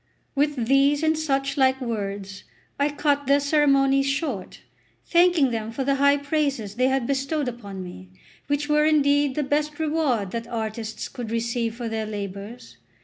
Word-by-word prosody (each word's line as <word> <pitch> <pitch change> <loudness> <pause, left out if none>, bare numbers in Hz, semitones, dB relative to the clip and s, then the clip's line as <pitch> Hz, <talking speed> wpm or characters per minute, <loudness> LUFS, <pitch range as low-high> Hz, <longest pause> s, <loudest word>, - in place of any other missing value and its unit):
With 285 -4 0
these 275 +4 +3
and 315 0 +3
such 275 -2 -1
like 265 -1 +3
words 200 -5 -4 0.4
I 285 +1 +2
cut 285 -1 0
their 280 +1 +5
ceremonies 275 -2 +3
short, 275 - -3 0.4
thanking 345 -6 +4
them 225 -1 -3
for 265 +4 -3
the 275 +1 +1
high 280 +1 +4
praises 285 -7 -1
they 255 +3 +2
had 265 -2 +1
bestowed 275 +2 -1
upon 200 -6 -6
me, 95 - -10 0.4
which 290 0 -1
were 300 0 +3
indeed 285 -2 +3
the 300 - 0
best 295 +2 -1
reward 295 - 0
that 230 0 -4
artists 220 -1 -4
could 240 -3 -7
receive 230 0 -1
for 240 -1 -5
their 220 -1 -3
labours. 200 - -7
270 Hz, 160 wpm, -24 LUFS, 225-290 Hz, 0.4 s, their